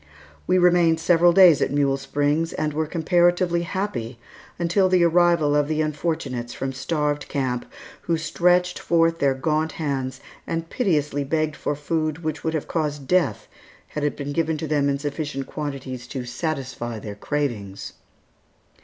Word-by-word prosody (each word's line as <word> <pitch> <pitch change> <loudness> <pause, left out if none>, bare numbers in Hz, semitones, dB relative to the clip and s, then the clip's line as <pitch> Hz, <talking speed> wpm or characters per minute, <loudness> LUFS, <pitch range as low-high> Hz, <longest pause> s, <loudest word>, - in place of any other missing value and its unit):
We 185 - +3
remained 175 -2 +4
several 175 +1 +4
days 175 -4 +7
at - - +2
Mule 140 -1 +2
Springs, 145 +4 0
and 155 -1 -2
were 155 +1 -1
comparatively 175 +1 +2
happy 170 - -3 0.4
until 180 +3 +2
the 185 -1 +4
arrival 170 -3 +3
of 145 -1 +2
the 155 0 0
unfortunates 145 -6 -3
from 135 0 -3
Starved 145 +2 -1
Camp, 130 - -2 0.3
who 165 -1 0
stretched 180 +2 +1
forth 165 0 +2
their 135 -1 +2
gaunt 155 +3 0
hands 135 -4 -3 0.3
and 165 0 -3
piteously 150 - 0
begged 155 +1 -1
for 145 - -2
food 155 +2 -2
which 155 -1 -3
would 160 0 -1
have 155 - -3
caused 150 -4 -2
death 175 - +1 0.4
had 150 - -4
it 145 - -1
been 145 0 -4
given 160 0 0
to 160 - -4
them 145 -2 +1
in 140 - 0
sufficient 145 -1 -4
quantities 135 -4 -6
to 130 -3 -5
satisfy 130 -4 -4
their 105 -1 -7
cravings. 105 -5 -3
155 Hz, 155 wpm, -23 LUFS, 140-165 Hz, 0.4 s, days